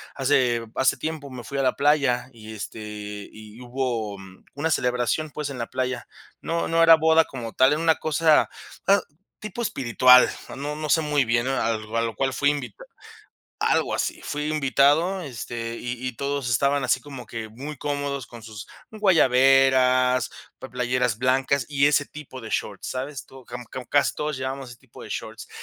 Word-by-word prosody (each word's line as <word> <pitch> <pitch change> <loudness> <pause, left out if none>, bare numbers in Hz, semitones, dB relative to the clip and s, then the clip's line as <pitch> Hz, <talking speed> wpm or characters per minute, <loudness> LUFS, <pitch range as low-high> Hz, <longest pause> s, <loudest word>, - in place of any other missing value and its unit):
Hace 125 -4 +2
hace 130 - +2
tiempo 155 -3 -5
me 125 -2 -8
fui 140 +5 -6
a - - +2
la 130 - +2
playa 140 -4 +2
y, 110 -1 -11
este 110 +1 -7 0.5
y 110 +1 -13
hubo 120 -5 -3 0.4
una 160 +3 -1
celebración, 125 +4 0
pues, 150 -2 -4
en 135 - -6
la 115 - -3
playa. 130 0 -3 0.3
No 170 0 -1
no 165 0 +2
era 165 0 +9
boda 160 0 +4
como 120 -4 -7
tal, 130 +2 +4
era 155 - -1
una 160 -2 +4
cosa, 155 0 +3 0.4
ah, 200 +1 +5 0.4
tipo 215 +3 -6
espiritual, 125 - +5 0.3
no 145 +2 -4
no 155 0 -5
sé 160 - +4
muy 150 -3 +1
bien. 120 +2 +1
A 135 -3 0
a 110 +1 -3
lo 115 -1 -2
cual 135 -1 0
fui 145 - +2
invita 130 -8 -4 0.8
Algo - - +1
así. - - -2
Fui 150 +1 -3
invitado, 155 +5 +2
este, 115 -3 -5
y 125 +1 -5
y 125 - -3
todos 140 -2 -2
estaban 140 +4 +2
así 125 - +2
como 135 -4 -10
que 115 -2 -6
muy 140 +7 -8
cómodos 140 -2 -3
con 120 -1 -11
sus 110 -3 -10 0.2
guayaberas, 130 - +4 0.3
pla - - -8
playeras 125 -2 0
blancas 130 +1 +1
y 140 0 +3
ese 145 -1 +2
tipo 140 -4 -10
de 110 - -9
shorts, 100 -2 -3
¿sabes? 130 +1 -5
Tú 130 -1 -14
como 120 0 -7
como 125 0 -8
casi 145 +2 +2
todos 150 -2 -3
llevábamos 130 -1 -5
ese 120 - -12
tipo - - -15
de - - -9
shorts, - - -6
130 Hz, 180 wpm, -24 LUFS, 120-145 Hz, 0.8 s, era